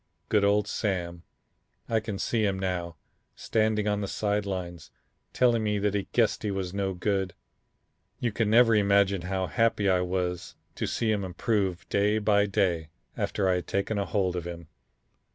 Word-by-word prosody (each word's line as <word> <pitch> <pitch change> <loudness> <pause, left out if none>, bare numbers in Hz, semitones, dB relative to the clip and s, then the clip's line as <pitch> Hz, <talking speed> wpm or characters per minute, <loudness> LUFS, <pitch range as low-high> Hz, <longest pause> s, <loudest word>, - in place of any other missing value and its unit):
Good 105 -2 +3
old 100 +1 +3
Sam, 85 -5 -2 0.7
I 115 - +2
can 105 -2 -5
see 110 +2 0
him 100 -2 +1
now, 90 -3 -3 0.4
standing 110 -1 0
on 105 0 0
the 100 - -2
side 105 0 -1
lines 90 -3 -5 0.4
telling 120 -3 +3
me 105 -1 0
that 100 0 0
he 100 -2 -2
guessed 115 -3 +2
he 105 - -2
was 95 -2 -3
no 100 -1 -1
good. 95 -1 -1 0.8
You 120 - 0
can 105 0 0
never 115 +1 +6
imagine 100 -2 +3
how 95 +1 -2
happy 115 0 +1
I 90 -1 +3
was 90 -1 -2 0.2
to - - -3
see 115 -2 0
him 105 -2 0
improve 95 0 -1
day 105 +1 +2
by 105 -1 +3
day 90 -6 0 0.3
after 100 -2 -1
I 95 - +3
had 90 - -5
taken 100 +2 -1
a 100 - 0
hold 90 0 0
of 85 -1 -4
him. 85 -2 -8
100 Hz, 175 wpm, -27 LUFS, 90-105 Hz, 0.8 s, never